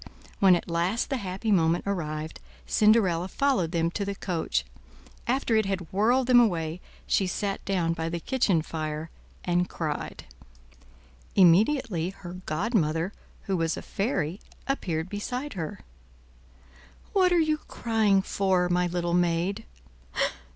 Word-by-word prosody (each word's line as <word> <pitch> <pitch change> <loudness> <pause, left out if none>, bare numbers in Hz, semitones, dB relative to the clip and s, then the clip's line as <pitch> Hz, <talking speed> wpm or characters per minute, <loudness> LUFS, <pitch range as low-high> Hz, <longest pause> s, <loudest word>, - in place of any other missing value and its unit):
When 190 -2 +7
at 175 - -3
last 175 +9 0
the 270 - +1
happy 195 +1 -3
moment 165 -3 +3
arrived, 155 -5 -3 0.3
Cinderella 195 -5 +3
followed 255 - +1
them 165 -1 +1
to 200 - -2
the 200 0 -3
coach; 180 -4 -1 0.6
after 245 -2 +1
it 220 -2 +2
had 190 -4 -3
whirled 240 +6 +3
them 245 -1 +6
away, 170 -6 +1 0.2
she 190 - +2
sat 195 +1 -2
down 175 -4 +1
by 165 0 -3
the 170 +1 -3
kitchen 190 -6 +1
fire 155 0 -4 0.3
and 180 0 +1
cried. 155 -3 -4 1.1
Immediately 190 - +4
her 180 -2 -9
godmother, 170 -1 0 0.3
who 195 - -1
was 165 -2 0
a - - -6
fairy, 195 - -2 0.3
appeared 170 -12 -1
beside 250 +8 -4
her. 165 -6 -5 1.3
"What 370 -2 +4
are 355 - +4
you 310 -1 +2
crying 215 -4 +2
for, 185 -3 +1
my 180 0 +2
little 175 0 -1
maid?" 175 +4 +1
185 Hz, 135 wpm, -27 LUFS, 165-220 Hz, 1.3 s, When